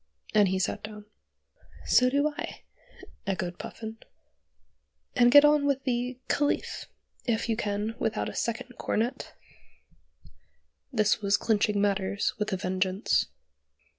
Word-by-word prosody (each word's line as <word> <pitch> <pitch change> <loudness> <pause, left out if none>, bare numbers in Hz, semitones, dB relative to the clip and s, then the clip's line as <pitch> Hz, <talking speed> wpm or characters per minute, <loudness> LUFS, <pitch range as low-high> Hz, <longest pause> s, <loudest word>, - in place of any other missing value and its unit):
and 210 -2 +5
he 190 +1 0
sat 185 - -1
down. 210 -1 -9 0.8
"So 250 0 +5
do 285 +3 +2
I," - - -6 0.6
echoed 180 -2 -2
Puffin, 220 0 -7 1.2
"and 240 0 +5
get 290 +2 +9
on 295 -1 +4
with 275 -1 0
'The 250 0 -1
Caliph' 290 0 0 0.4
if 230 -2 0
you 225 - +1
can 210 0 -2
without 220 -1 -1
a - - -5
second 240 +2 -3
cornet." 230 +4 -2 1.6
This 215 +1 +2
was 200 -1 +3
clinching 210 -2 +1
matters 200 0 0
with 210 0 -1
a 190 - 0
vengeance. 185 +2 0
215 Hz, 125 wpm, -28 LUFS, 200-245 Hz, 1.6 s, get